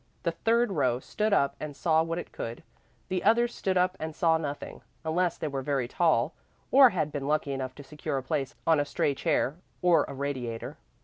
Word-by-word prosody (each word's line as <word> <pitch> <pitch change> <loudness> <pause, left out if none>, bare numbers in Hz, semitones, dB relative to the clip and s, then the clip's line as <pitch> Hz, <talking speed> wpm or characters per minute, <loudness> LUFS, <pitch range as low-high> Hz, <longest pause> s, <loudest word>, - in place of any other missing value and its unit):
The 170 - +1
third 230 +5 +1
row 130 -8 +1
stood 210 +10 -1
up 140 -9 +3
and 150 -2 -6
saw 160 0 +3
what 165 +1 -2
it 175 - -6
could. 115 +1 -6 0.5
The 185 -1 -1
others 235 +3 +3
stood 190 -1 -1
up 180 +1 +2
and 160 -1 -5
saw 160 -1 +3
nothing, 145 -2 -5 0.2
unless 170 +2 +1
they 155 - -3
were 135 -2 -3
very 135 -3 -1
tall 155 -1 +2 0.4
or 265 -1 +8
had 160 -7 -1
been 140 -2 -4
lucky 150 -1 +1
enough 130 -1 -4
to 145 - -10
secure 140 0 -4
a 130 - -3
place 145 -1 -2
on 160 -2 +4
a - - +3
stray 145 - 0
chair 135 +2 0 0.3
or 175 -2 +5
a - - -7
radiator. 130 -5 -4
155 Hz, 205 wpm, -28 LUFS, 140-175 Hz, 0.5 s, or